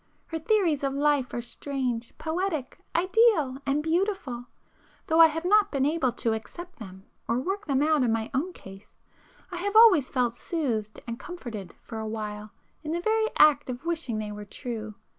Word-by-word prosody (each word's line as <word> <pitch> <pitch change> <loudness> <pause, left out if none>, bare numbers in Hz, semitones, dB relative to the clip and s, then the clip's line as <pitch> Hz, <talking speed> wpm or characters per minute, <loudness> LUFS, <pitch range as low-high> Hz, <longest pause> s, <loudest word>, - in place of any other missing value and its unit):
Her 325 - -4
theories 335 -5 +2
of 275 0 0
life 285 -2 +2
are 240 - -3
strange, 250 -2 -3
poetic, 320 -4 -3 0.2
ideal 360 - +3
and 285 +2 +1
beautiful;—though 320 - -3
I 325 - +10
have 325 +2 -4
not 415 +2 +4
been 275 -2 +1
able 295 -4 +1
to 230 -1 0
accept 345 +11 -8
them 190 -2 -10 0.2
or 230 - +1
work 385 +9 -3
them 275 -1 +2
out 310 -1 +3
in 245 -3 +2
my 225 0 -1
own 300 +8 -1
case, 195 - -14 0.5
I 355 - -4
have 405 +4 -2
always 405 - +7
felt 245 -3 +1
soothed 235 - -3
and 235 +1 -5
comforted 240 - -8
for 225 - -7
a 220 - -4
while 210 -1 -5 0.3
in 310 0 -4
the 340 - 0
very 440 +4 +1
act 290 -2 +5
of 250 +5 -6
wishing 325 -9 -1
they 215 -1 -4
were 210 0 -7
true. 220 -1 -6
280 Hz, 180 wpm, -27 LUFS, 235-340 Hz, 0.5 s, I